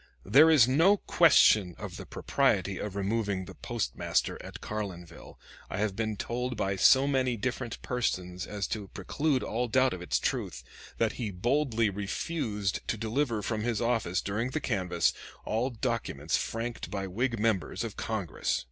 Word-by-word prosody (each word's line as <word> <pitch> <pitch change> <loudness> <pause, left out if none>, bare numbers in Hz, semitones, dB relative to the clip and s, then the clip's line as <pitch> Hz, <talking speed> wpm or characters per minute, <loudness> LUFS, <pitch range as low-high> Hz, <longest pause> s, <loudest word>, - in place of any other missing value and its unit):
"There 145 +11 +7
is 145 -7 +7
no 165 +10 +5
question 110 - +5
of - - -7
the - - -9
propriety - - 0
of 105 -2 -5
removing 100 -1 -1
the - - -10
postmaster - - -2
at - - -9
Carlinville, 90 -6 -7 0.3
I - - -4
have 105 -1 0
been 110 -1 -2
told 125 +3 -3
by 95 -1 0
so 130 +8 +6
many 130 -3 +1
different 120 +1 -3
persons 90 -7 -2
as 100 -2 -3
to 105 -3 -4
preclude 145 +6 -1
all 120 +3 -1
doubt 130 +3 +3
of 90 - -6
its 90 - 0
truth, 65 - -2 0.3
that 115 -1 +2
he 110 - -1
boldly 115 +2 +1
refused 105 - -2
to 110 - -1
deliver 115 0 -1
from 110 -2 -2
his 115 -1 -1
office 115 -6 0
during 110 +5 -1
the 155 - -2
canvass 95 - 0 0.3
all 115 +4 0
documents 115 - -2
franked 115 +1 -3
by 100 -2 -3
Whig 115 +6 -1
members 110 -1 0
of 115 -3 -5
Congress." 105 -7 -2
110 Hz, 160 wpm, -29 LUFS, 100-125 Hz, 0.3 s, There